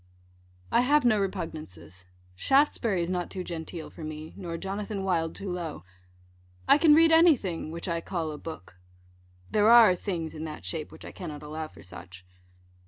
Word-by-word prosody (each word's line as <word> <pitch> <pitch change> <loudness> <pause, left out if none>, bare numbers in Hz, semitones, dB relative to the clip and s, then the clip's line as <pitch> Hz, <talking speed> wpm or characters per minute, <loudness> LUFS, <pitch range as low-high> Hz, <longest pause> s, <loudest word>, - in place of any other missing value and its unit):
I - - +4
have 285 +2 +3
no 215 -3 +4
repugnances. 125 - -6 0.3
Shaftesbury 230 - +2
is 170 - -4
not 180 -1 -2
too 185 -2 -5
genteel 165 -1 -7
for 165 - -10
me, 155 +1 -7
nor 170 -3 -5
Jonathan 200 +2 -4
Wild 165 -4 0
too 195 -2 -5
low. 170 - -5 0.8
I 290 - +6
can 305 -2 +7
read 325 +1 +6
any 325 0 +7
thing 175 -7 -5
which 170 +3 -6
I 170 -1 -1
call 165 -3 -3
a 150 - -8
book. 155 - -9 0.7
There 210 +1 +4
are 230 -5 +8
things 170 -4 -4
in 155 - -6
that 155 - -8
shape 160 -3 -5
which - - -12
I - - -8
cannot 155 -5 -8
allow 155 +1 -5
for - - -16
such. 90 0 -11
175 Hz, 175 wpm, -28 LUFS, 155-205 Hz, 0.8 s, are